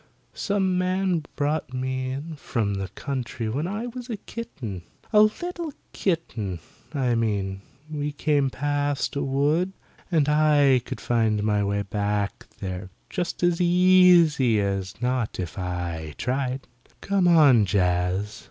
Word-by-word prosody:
Some 190 -3 0
man 185 -3 0
brought 145 -2 -1
me 130 0 -2
in 145 +5 -5
from 115 -7 -2
the 95 -1 -3
country 125 -1 -4
when 145 +9 -1
I 210 +5 -3
was 245 +1 -7
a 225 - -3
kitten; 125 - -7 0.3
a 210 - +8
little 335 +8 0 0.2
kitten, 120 - -2 0.3
I 130 -5 0
mean; 100 -4 -1 0.3
we 150 -1 -3
came 145 -2 +1
past 145 +1 -1
a 140 - 0
wood, 145 +7 +1 0.4
and 155 -4 +3
I 150 -4 +4
could - - -6
find 110 -3 +1
my 105 -1 +2
way 100 0 0
back 100 0 -2
there 95 -1 -5 0.2
just 175 -1 -3
as 175 0 +2
easy 175 - +5
as 100 -1 -2
not 125 -5 -1
if 90 -3 -4
I 85 -4 -4
tried. 130 +1 -2 0.3
Come 195 -2 +2
on, 140 - +6
Jaz. 90 +2 0
135 Hz, 135 wpm, -25 LUFS, 105-170 Hz, 0.4 s, a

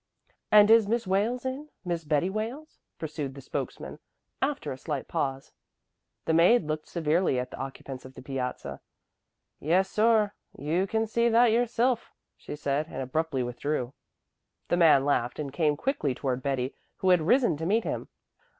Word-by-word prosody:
"And 210 0 +7
is 225 -2 +6
Miss 230 +1 0
Wales 215 +7 0
in 270 +4 -4 0.2
Miss 170 -2 -2
Betty 150 +3 +1
Wales?" 230 +10 -5 0.2
pursued 150 -4 -5
the - - -9
spokesman, 135 - -5 0.4
after 280 +1 -1
a 130 - -5
slight 145 -3 -4
pause. 135 -1 -3 0.7
The 160 - +1
maid 175 +8 +5
looked 155 0 -4
severely 165 -3 +1
at 125 - -4
the - - -8
occupants 135 -1 -7
of 130 0 -12
the - - -10
piazza. 130 -2 -4 0.8
"Yes, 185 +5 +2
sor, 215 -1 +3 0.2
you 165 +7 0
can 220 +2 0
see 235 +2 +1
that 235 0 +5
yoursilf," 240 +1 +1 0.3
she - - -8
said 145 +1 -1
and 135 - -5
abruptly 140 0 -1
withdrew. 125 +1 -3 0.8
The 175 - +2
man 155 -6 +6
laughed 125 -4 0
and 140 -3 -5
came 150 -2 +1
quickly 160 - -1
toward 130 -1 -2
Betty, 130 -1 -1 0.2
who 190 - +2
had 180 -2 +5
risen 235 - +3
to 160 +2 -3
meet 220 +4 +2
him. - - -3
165 Hz, 165 wpm, -28 LUFS, 140-220 Hz, 0.8 s, And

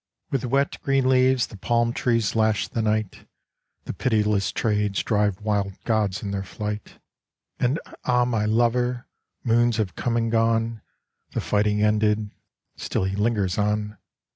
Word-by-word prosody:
With 135 -2 -1
wet, 135 +3 0
green 135 -2 +1
leaves 130 -1 +4
the 105 - -12
palm 120 +3 +1
trees 115 -4 0
lash 110 -1 +2
the 115 - -2
night, 110 -2 -2 0.6
The - - -5
pitiless 105 -5 +1
trades 105 -2 0
drive 105 -3 +1
wild 100 -2 0
gods 110 -4 0
in 100 - -3
their 100 -1 -2
flight. 105 +2 -6 0.6
And, 130 +6 +1 0.2
ah, 125 -1 +2
my 115 -4 0
lover! 120 +3 +1 0.4
Moons 120 -1 +3
have 105 -5 -1
come 120 -1 -1
and 115 -1 0
gone, 115 -1 +1 0.5
The - - -1
fighting 105 0 +1
ended, 105 0 +2 0.4
still - - -2
he 95 +1 -1
lingers 105 -3 0
on. 105 0 -1
110 Hz, 145 wpm, -24 LUFS, 105-120 Hz, 0.6 s, leaves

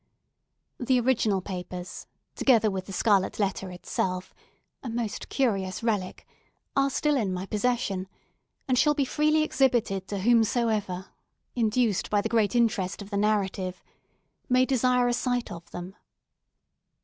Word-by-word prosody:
The 250 0 +2
original 230 -6 +2
papers, 180 -1 -7 0.3
together 225 -5 +3
with 190 -1 -4
the - - -7
scarlet 195 0 +2
letter 195 -2 -1
itself—a 185 +6 -6
most 230 -2 -4
curious 195 -7 0
relic—are 225 +5 -3
still 300 +2 +1
in 215 -8 0
my 185 +1 -3
possession, 205 -3 -1 0.6
and 255 -2 +2
shall 300 -1 +4
be 280 -2 +1
freely 305 +3 +2
exhibited 235 -10 +1
to 205 - -3
whomsoever, 220 -4 +1 0.5
induced 225 -3 +1
by 205 - +2
the 225 - -3
great 220 -2 +2
interest 215 -5 +1
of 200 - -14
the - - -2
narrative, 195 -3 0 0.7
may 255 0 +4
desire 250 -1 +2
a 245 - +1
sight 245 0 -1
of 170 0 -9
them. 180 +2 -8
215 Hz, 130 wpm, -27 LUFS, 190-245 Hz, 0.7 s, shall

